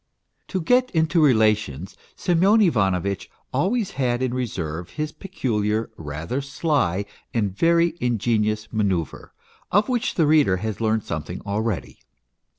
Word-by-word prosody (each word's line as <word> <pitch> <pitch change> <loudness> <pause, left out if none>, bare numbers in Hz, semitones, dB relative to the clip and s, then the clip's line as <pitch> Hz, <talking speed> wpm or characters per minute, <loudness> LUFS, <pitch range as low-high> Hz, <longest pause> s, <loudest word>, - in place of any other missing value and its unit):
To 190 - -2
get 250 +9 +3
into 160 +1 +3
relations 105 - +2 0.2
Semyon 185 +5 +3
Ivanovitch 100 - +1 0.2
always 195 - 0
had 125 -4 0
in 125 -1 -1
reserve 90 -10 -3
his 150 0 -4
peculiar, 115 - -2
rather 80 - -4
sly, 135 - 0 0.3
and 105 -5 0
very 170 +5 +3
ingenuous 110 -2 0
manoeuvre, 95 -7 -1 0.4
of 205 +6 +3
which 245 -3 0
the 165 - +3
reader 150 -11 +4
has 110 +2 -4
learned 110 -1 +1
something 80 +2 -5
already. 105 0 -3
115 Hz, 125 wpm, -23 LUFS, 100-160 Hz, 0.4 s, reader